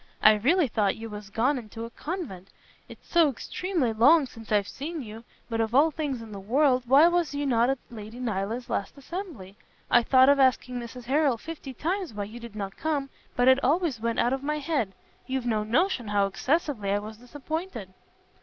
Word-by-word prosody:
I 215 Hz, -, +9 dB
really 285 Hz, -, +3 dB
thought 210 Hz, -4 st, +1 dB
you 225 Hz, 0 st, -8 dB
was 210 Hz, -1 st, -8 dB
gone 250 Hz, +7 st, +1 dB
into 225 Hz, 0 st, -8 dB
a 230 Hz, -, -10 dB
convent, 245 Hz, -, -6 dB, 0.4 s
it's -, -, -14 dB
so 335 Hz, -3 st, +4 dB
extreme 365 Hz, -, -3 dB, 0.2 s
long 295 Hz, +5 st, +6 dB
since 225 Hz, -3 st, -12 dB
I've 205 Hz, -2 st, +2 dB
seen 310 Hz, +1 st, -5 dB
you. 220 Hz, 0 st, -9 dB, 0.2 s
But 225 Hz, -1 st, -1 dB
of 225 Hz, +2 st, -1 dB
all 305 Hz, +4 st, +5 dB
things 280 Hz, -6 st, -3 dB
in 220 Hz, -, -11 dB
the 200 Hz, -, -7 dB
world, 255 Hz, +5 st, +2 dB
why 280 Hz, +6 st, +7 dB
was 345 Hz, -4 st, 0 dB
you 290 Hz, 0 st, -1 dB
not 240 Hz, -2 st, +3 dB
at 270 Hz, -, +1 dB
Lady 220 Hz, +1 st, -9 dB
Nyland's 225 Hz, +1 st, -3 dB
last 200 Hz, -, -3 dB
assembly? 280 Hz, -, -7 dB, 0.3 s
I 240 Hz, -, +7 dB
thought 260 Hz, +2 st, +5 dB
of 280 Hz, 0 st, +5 dB
asking 255 Hz, -1 st, +2 dB
Mrs 240 Hz, +1 st, -8 dB
Harrel 275 Hz, -1 st, +2 dB
fifty 305 Hz, +1 st, -8 dB
times 355 Hz, -, -2 dB
why 205 Hz, -, -2 dB
you 215 Hz, +4 st, -8 dB
did 235 Hz, -2 st, -10 dB
not 195 Hz, -2 st, -5 dB
come, 285 Hz, -4 st, -2 dB, 0.2 s
but 245 Hz, +1 st, +2 dB
it 260 Hz, +1 st, +5 dB
always 300 Hz, -2 st, +1 dB
went 230 Hz, 0 st, -1 dB
out 240 Hz, +2 st, +2 dB
of 270 Hz, -, -2 dB
my 300 Hz, +2 st, -1 dB
head. 280 Hz, -10 st, -1 dB, 0.3 s
You've 260 Hz, -2 st, -2 dB
no 220 Hz, -3 st, 0 dB
notion 245 Hz, -, +1 dB
how 205 Hz, -1 st, +2 dB
excessively 255 Hz, -, -1 dB
I 200 Hz, -, +2 dB
was 215 Hz, +1 st, -7 dB
disappointed." 270 Hz, -, -6 dB
250 Hz, 200 wpm, -27 LUFS, 220-295 Hz, 0.4 s, I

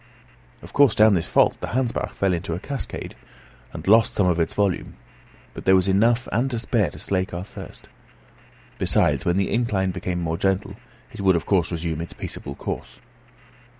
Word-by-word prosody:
Of -, -, -12 dB
course, 140 Hz, -6 st, +5 dB
down 110 Hz, 0 st, +6 dB
this 85 Hz, -4 st, 0 dB
fault -, -, +3 dB
the -, -, -5 dB
Hansbach 125 Hz, -3 st, -1 dB
fell 95 Hz, -2 st, +1 dB
in 85 Hz, -, -1 dB
a 80 Hz, -, -1 dB
cascade, 135 Hz, +8 st, -5 dB, 0.6 s
and -, -, -8 dB
lost 110 Hz, +2 st, +5 dB
some 100 Hz, -, +2 dB
of 90 Hz, -2 st, +2 dB
its 80 Hz, -, -1 dB
volume; 100 Hz, -3 st, -1 dB, 0.6 s
but -, -, -9 dB
there 95 Hz, -, +6 dB
was 95 Hz, 0 st, +2 dB
enough 115 Hz, +6 st, +3 dB
and 120 Hz, +5 st, +1 dB
to 120 Hz, -, -2 dB
spare 115 Hz, -3 st, +1 dB
to -, -, -12 dB
slake 95 Hz, -2 st, -2 dB
our 90 Hz, -, -4 dB
thirst. 100 Hz, -, -11 dB, 0.9 s
Besides, -, -, +2 dB
when 85 Hz, +1 st, +2 dB
the 95 Hz, -, 0 dB
incline 105 Hz, -5 st, 0 dB
became 90 Hz, -1 st, -3 dB
more 80 Hz, -1 st, -2 dB
gentle, 95 Hz, 0 st, 0 dB, 0.4 s
it -, -, -8 dB
would 95 Hz, -2 st, +4 dB
of 85 Hz, -, -1 dB
course 90 Hz, -4 st, +1 dB
resume 80 Hz, -1 st, -3 dB
its 85 Hz, -, -6 dB
peaceable 70 Hz, -, -7 dB
course. -, -, -6 dB
95 Hz, 185 wpm, -23 LUFS, 90-110 Hz, 0.9 s, down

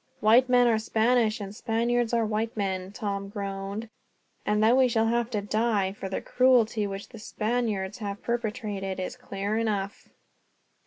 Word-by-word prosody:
"White 235 Hz, +4 st, +5 dB
men 245 Hz, -1 st, +5 dB
are 225 Hz, -2 st, +3 dB
Spaniards, 225 Hz, 0 st, +2 dB
and 200 Hz, 0 st, -7 dB
Spaniards 235 Hz, +1 st, 0 dB
are 230 Hz, -1 st, +2 dB
white 220 Hz, +1 st, -2 dB
men," 190 Hz, -2 st, -2 dB
Tom 200 Hz, -2 st, -4 dB
groaned, 200 Hz, +1 st, -5 dB, 0.6 s
"and 210 Hz, +1 st, +2 dB
that 230 Hz, +3 st, +5 dB
we 260 Hz, -1 st, +5 dB
shall 225 Hz, -2 st, +2 dB
have 235 Hz, 0 st, +1 dB
to 215 Hz, -4 st, -1 dB
die, 210 Hz, -2 st, +1 dB
for 195 Hz, -1 st, -6 dB
the 190 Hz, -, -3 dB
cruelty 235 Hz, -5 st, +3 dB
which 195 Hz, 0 st, -6 dB
the 230 Hz, -, -11 dB
Spaniards 215 Hz, -2 st, -2 dB
have 200 Hz, -2 st, -5 dB
perpetrated, 210 Hz, -5 st, -3 dB
is 185 Hz, +7 st, -4 dB
clear 210 Hz, -3 st, -3 dB
enough. 205 Hz, -3 st, -2 dB
215 Hz, 160 wpm, -27 LUFS, 200-235 Hz, 0.6 s, White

